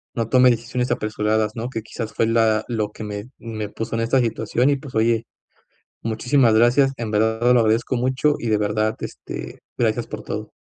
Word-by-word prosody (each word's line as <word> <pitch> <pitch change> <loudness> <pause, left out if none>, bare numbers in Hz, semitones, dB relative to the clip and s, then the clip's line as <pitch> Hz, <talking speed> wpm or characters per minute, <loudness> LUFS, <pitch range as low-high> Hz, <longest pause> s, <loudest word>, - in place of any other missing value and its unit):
no 115 -2 -1
tome 125 +1 +5
decisiones 125 +1 -1
apresuradas, 110 0 0
¿no?, 120 +1 -4
que 115 -4 -5
quizás 110 0 -6
fue - - +1
la 110 -1 +2
lo 110 -3 -2
que 110 - -9
me 105 +2 -6
me 110 -3 -5
puso 115 +2 -4
en 115 - 0
esta 115 +3 +2
situación. 120 +2 +1
Y - - +3
pues 135 -3 -11
oye, 115 0 +2 0.8
muchísimas 115 +2 +2
gracias, 125 +5 +4
en 115 -2 -4
verdad 110 +3 +2
lo 125 - +5
agradezco 115 +3 +1
mucho, 130 +4 +1
y 120 - -4
de 110 - +3
verdad, 110 +1 0
este, - - -7 0.2
gracias - - 0
por - - -6
todo. - - -5
115 Hz, 190 wpm, -22 LUFS, 110-125 Hz, 0.8 s, tome